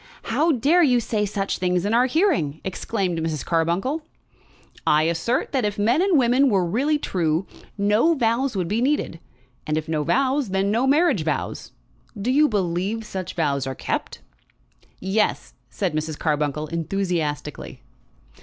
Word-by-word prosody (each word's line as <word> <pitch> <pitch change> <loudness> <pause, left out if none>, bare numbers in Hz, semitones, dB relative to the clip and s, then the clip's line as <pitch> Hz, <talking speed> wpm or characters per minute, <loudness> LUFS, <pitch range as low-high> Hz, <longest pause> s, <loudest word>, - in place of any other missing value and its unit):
"How 325 +2 +3
dare 290 +8 +3
you 255 -7 +4
say 210 -2 -1
such 195 0 -2
things 180 0 0
in 210 - 0
our 245 +2 +4
hearing!" 265 - +1
exclaimed 190 -2 -2
Mrs. 160 -2 -3
Carbuncle. 175 - 0 0.9
"I 150 +1 +4
assert 170 +10 0
that 265 -4 0
if 205 -1 -1
men 230 +10 +2
and 380 -4 +3
women 260 +2 +4
were 195 -5 +2
really 275 - +1
true, 170 - -1 0.3
no 210 +11 +3
vows 240 0 0
would 180 -3 -1
be 215 +6 0
needed; 265 - 0 0.5
and 155 0 0
if 155 0 -3
no 155 -1 -1
vows, 270 - +1
then 195 +1 0
no 235 +5 +1
marriage 310 +6 +3
vows. - - -3 0.5
Do 230 +6 0
you 295 +3 +4
believe 195 +2 -1
such 185 -3 -6
vows 140 -5 0
are 135 - -4
kept?" - - -4 0.8
"Yes," 200 +3 -1 0.2
said 190 -6 -2
Mrs. 155 0 -3
Carbuncle 150 -1 -1
enthusiastically. 165 -4 -3
200 Hz, 155 wpm, -23 LUFS, 165-255 Hz, 0.9 s, you